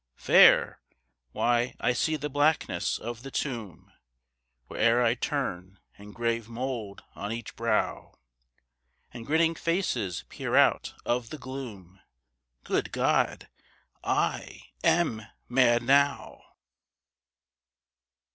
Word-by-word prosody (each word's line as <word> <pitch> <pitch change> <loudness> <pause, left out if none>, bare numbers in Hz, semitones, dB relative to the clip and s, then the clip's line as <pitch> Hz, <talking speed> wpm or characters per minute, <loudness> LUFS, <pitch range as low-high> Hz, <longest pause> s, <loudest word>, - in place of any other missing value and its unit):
Fair? - - +5 0.5
Why, 120 +1 0
I 125 - +1
see 155 +6 0
the 150 -1 -3
blackness 145 +2 +1
of 120 0 -7
the 135 - -8
tomb 115 - -5 0.8
Where'er 115 - +2
I 115 -1 +3
turn, 100 - -4 0.2
and 100 0 -13
grave 115 -1 -2
mould 115 -4 -5
on 100 +2 -5
each 115 -1 -6
brow; 115 -2 -1 1.0
And 120 0 -9
grinning 160 +2 +3
faces 145 - -2
peer - - -4
out - - +3
of 120 -1 -1
the 155 - -7
gloom 115 - -9 0.6
Good - - -1
God! - - 0 0.6
I - - -2
am 160 -11 +2 0.3
mad 120 -1 +3
now. 140 +3 +1
120 Hz, 105 wpm, -27 LUFS, 110-140 Hz, 1.0 s, Fair